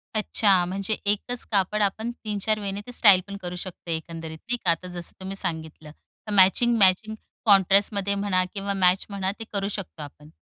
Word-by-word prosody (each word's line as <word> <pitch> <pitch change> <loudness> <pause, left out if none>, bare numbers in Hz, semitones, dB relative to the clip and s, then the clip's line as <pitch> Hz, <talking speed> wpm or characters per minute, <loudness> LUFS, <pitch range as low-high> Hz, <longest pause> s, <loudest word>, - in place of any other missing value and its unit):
अच्छा, 205 -3 +3
म्हणजे 195 +4 -2
एकच 210 +4 -1
कापड 205 +1 +1
आपण 220 +4 -1
3-4 215 0 -1
वेने 200 0 -4
ते - - -7
स्टाइल 205 -6 +6
पण 200 0 -7
करू 180 -1 -5
शकते, 175 -2 -5
एकंदरीत 160 0 -7
नाही 245 - 0
का, 180 -7 +1
आता 175 +2 -3
जसं 175 -1 -6
तुम्ही 190 +1 -6
सांगितलं. 160 -3 -4
तर 210 +7 -14
मॅचिंग-मॅचिंग 205 +1 +4 0.3
कॉन्ट्रास्टमध्ये 200 0 +3
म्हणा 200 -2 +1
किंवा 200 -1 -2
मॅच 185 0 +3
म्हणा, 195 -1 -2
ते - - -5
करू 200 -1 -1
शकतो 175 -4 -10
आपण. 150 +1 -13
195 Hz, 170 wpm, -25 LUFS, 180-205 Hz, 0.3 s, स्टाइल